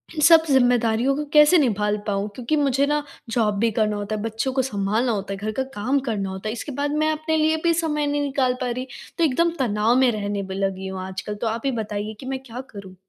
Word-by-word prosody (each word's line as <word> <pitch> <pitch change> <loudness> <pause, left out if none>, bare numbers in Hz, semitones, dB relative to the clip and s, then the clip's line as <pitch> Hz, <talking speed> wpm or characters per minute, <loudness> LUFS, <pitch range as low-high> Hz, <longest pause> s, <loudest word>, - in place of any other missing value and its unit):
इन 305 - -2
सब 325 +1 +7
ज़िम्मेदारियों 245 -1 +3
को 300 - -3
कैसे 300 +4 +7
निभा 210 - +1
ल 210 - +1
पाऊँ? 200 0 -1
क्योंकि 250 +4 -1
मुझे 280 -2 +2
ना 295 0 0 0.3
जॉब 220 -3 +1
भी 230 0 +2
करना 215 -1 0
होता 205 +1 -3
है, 210 - -4
बच्चों 225 +4 -2
को 265 - +2
संभालना 220 0 0
होता 200 -2 -3
है, 195 - -5
घर 215 +1 -3
का 265 - -2
काम 255 +7 +1
करना 200 -3 -2
होता 190 +2 -6
है, 220 - -2
इसके 285 - -6
बाद 285 +2 -2
मैं 310 - +2
अपने 315 +1 -1
लिए 315 +1 +2
भी 335 -1 +3
समय 300 -3 0
नहीं 290 0 0
निकाल 270 -3 +1
पा 250 - -1
रही। 255 +2 -4 0.3
तो 335 - +2
एकदम 330 +4 +2
तनाव 220 -1 +2
में 260 -2 +4
रहने 205 -2 -3
ब 190 - -8
लगी 190 0 -2
हूँ 190 -1 -5
आजकल 190 +2 -5
तो 230 - 0
आप 225 +1 -2
ही 270 - +2
बताइए 210 +1 -4
कि - - -9
मैं 265 0 -3
क्या 245 -1 -7
करूँ? 195 -3 -11
240 Hz, 250 wpm, -23 LUFS, 210-285 Hz, 0.3 s, सब